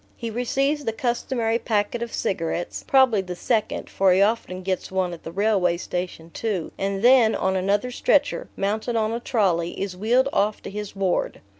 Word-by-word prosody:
He 230 -2 -4
receives 275 +5 0
the 225 - -1
customary 235 -2 -1
packet 215 +1 -1
of 235 -1 -4
cigarettes 175 -2 -2
(probably 260 -6 +4
the 180 -1 -6
second, 220 +4 -1
for 190 -1 +2
he 185 - +3
often 200 -3 0
gets 185 0 -2
one 185 -2 0
at 170 - -9
the 165 - -8
railway 190 -2 +2
station 175 -2 -5
too), 200 -6 -3
and 195 +1 -2
then, 245 -3 +6
on 190 0 0
another 200 +6 0
stretcher, - - +1
mounted 215 +4 -1
on 220 -1 +1
a 230 - -2
trolley, 190 -9 0
is 195 -2 -3
wheeled 240 +7 +2
off 210 +1 +1
to - - -7
his 210 0 -6
ward. 195 -2 -1
205 Hz, 180 wpm, -24 LUFS, 185-235 Hz, -, then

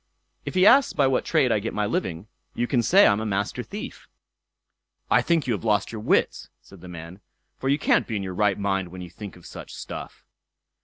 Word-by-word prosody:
"If - - -5
he 185 +1 +4
asks 265 +5 +6
by 145 - +2
what 130 -1 +1
trade 140 -7 +2
I 105 - +2
get 110 +3 -5
my 105 - 0
living, 100 - -3 0.3
you 120 - 0
can 120 0 +1
say 190 - +5
I'm 100 - +4
a 110 - -3
Master 100 +4 -2
Thief." 205 - -8 1.0
"I - - +5
think 165 -4 +1
you've 115 -5 -2
lost 105 -3 +1
your 110 -2 -6
wits", - - 0
said 95 -3 -17
the 90 - -11
man, 85 +1 -9 0.4
"for 135 - -2
you 140 - +3
can't - - +2
be 115 - -3
in 100 - -2
your 95 -1 -5
right 105 +1 +1
mind 95 -2 -1
when 90 +1 -9
you 90 -1 -9
think 100 +2 -9
of 90 - -17
such - - -10
stuff." - - -8
105 Hz, 220 wpm, -24 LUFS, 95-135 Hz, 1.0 s, asks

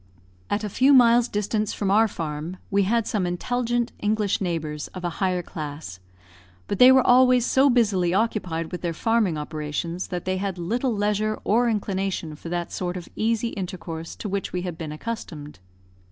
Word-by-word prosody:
At 205 +1 -1
a - - -1
few 265 +7 +4
miles' 240 -1 +6
distance 210 0 -1
from 195 -2 -1
our 220 +2 +5
farm, 160 -1 -5
we 200 0 +3
had 230 +2 +1
some 205 -6 -1
intelligent 240 +6 -1
English 210 -1 0
neighbours, 155 -5 -3
of 185 - -7
a 175 - -1
higher 180 -2 +1
class; 145 - -7 0.7
but 200 - -3
they 250 +1 +9
were 260 -1 +5
always 250 -1 +5
so 270 +2 +4
busily 200 -8 +2
occupied 185 -6 -1
with 180 - -5
their 170 -2 -2
farming 220 -5 +1
operations 155 +3 -4
that 180 -2 -5
they 185 0 0
had 190 -1 -3
little 235 +9 -1
leisure 210 0 0
or 235 +3 +3
inclination 195 -6 -2
for 165 - -9
that 175 0 -3
sort 180 0 -3
of 175 - -9
easy 230 +1 0
intercourse 175 -5 -6
to - - -6
which 200 -1 -3
we 180 -1 -3
had 180 -3 -4
been 160 -2 -6
accustomed. 155 - -6
195 Hz, 180 wpm, -24 LUFS, 170-225 Hz, 0.7 s, they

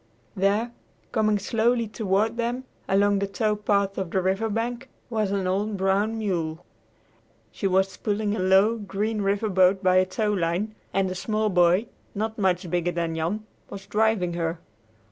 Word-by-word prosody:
There, 205 +5 +1 0.4
coming 215 -1 +2
slowly 230 +3 +1
toward 215 +1 0
them 240 +2 -2 0.3
along 200 +1 +3
the 200 - -1
tow 210 +2 0
path 200 -1 0
on 190 -3 -3
the 190 - 0
river 190 +4 0
bank, 235 +4 -3 0.2
was 215 -3 0
an 195 -1 -1
old 200 +3 -1
brown 195 +4 +1
mule. 170 -6 -2 0.9
She 195 - -2
was 190 +1 +1
pulling 210 0 -1
a - - -4
low, 190 +5 +4
green 210 +1 -2
river 200 +2 0
boat 190 -1 +3
by 185 0 +4
a 185 - +5
towline, 200 0 -1 0.2
and 190 -1 0
a - - -2
small 215 +3 -1
boy, 180 +3 +4 0.3
not 220 +2 -3
much 185 -2 +1
bigger 175 +1 0
than 170 -1 -2
Jan, 175 +7 -2 0.2
was 195 -1 -8
driving 210 -4 +1
her. 165 -1 -2
200 Hz, 165 wpm, -25 LUFS, 185-215 Hz, 0.9 s, a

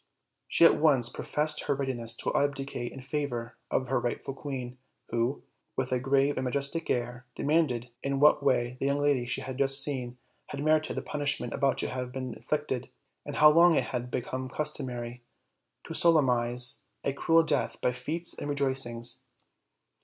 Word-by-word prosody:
She 170 - +5
at - - +6
once 135 -7 +4
professed 155 +1 -2
her 140 - +1
readi 135 -2 -1
ness 115 -1 -4
to - - -3
abdicate 140 -3 -1
in 135 - -9
favor 125 -4 -3
of 130 - 0
her 135 - +2
rightful 120 +2 -3
queen, 130 -3 -6 0.3
who, 120 +4 -1 0.3
with 130 -1 -2
a 125 - +2
grave 135 +2 +2
and 130 - -1
majestic 140 +5 -2
air, 120 +1 -2
demanded 140 -6 +1
in 140 0 -1
what 150 0 +6
way 125 -3 +1
the 135 - 0
young 140 +1 +1
lady 145 -4 +2
she - - -2
had 130 0 -6
just 135 0 +3
seen 125 -4 -3 0.3
had 140 0 -5
merited 155 0 +2
the - - -2
punish 145 0 -1
ment 120 - -5
about 135 -2 +1
to - - -1
have 125 -1 -4
been 130 -1 -4
inflicted, 145 -4 -3 0.4
and 145 - -4
how 150 - +8
long 170 +1 +6
it - - +3
had 125 0 -2
become 130 +1 -3
customary 125 -5 -4 0.6
to 165 - -7
solemnize 125 -7 +2 0.2
a 140 - 0
cruel 165 +3 +4
death 145 -3 -1
by 125 - +1
feasts 155 +8 -2
and 145 - -4
rejoicings. 130 -4 -1
135 Hz, 175 wpm, -29 LUFS, 125-145 Hz, 0.6 s, how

